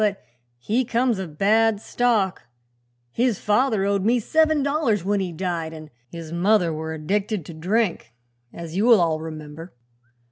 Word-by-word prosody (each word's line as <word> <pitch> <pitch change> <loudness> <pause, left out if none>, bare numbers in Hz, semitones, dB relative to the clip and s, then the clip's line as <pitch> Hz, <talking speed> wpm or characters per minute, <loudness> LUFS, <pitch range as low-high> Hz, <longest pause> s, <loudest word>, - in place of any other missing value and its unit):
But 205 -2 0 0.3
he 215 - 0
comes 235 -2 0
of 165 -6 -7
bad 220 +2 +3
stock; 220 -5 0 0.6
his 240 - +1
father 210 -1 +1
owed 200 -1 0
me 240 +4 +3
seven 315 +4 +2
dollars 275 - 0
when 205 +1 +1
he 185 -2 -3
died 165 -2 -4
an' 155 -1 -11 0.2
his 165 -2 -9
mother 175 0 +2
were 160 +1 -5
addicted 195 +3 -2
to 170 - -9
drink, 180 - -1 0.4
as 170 -1 -8
you'll 225 +2 +5
all 165 -2 +1
remember. 155 0 -9
195 Hz, 150 wpm, -23 LUFS, 165-225 Hz, 0.6 s, you'll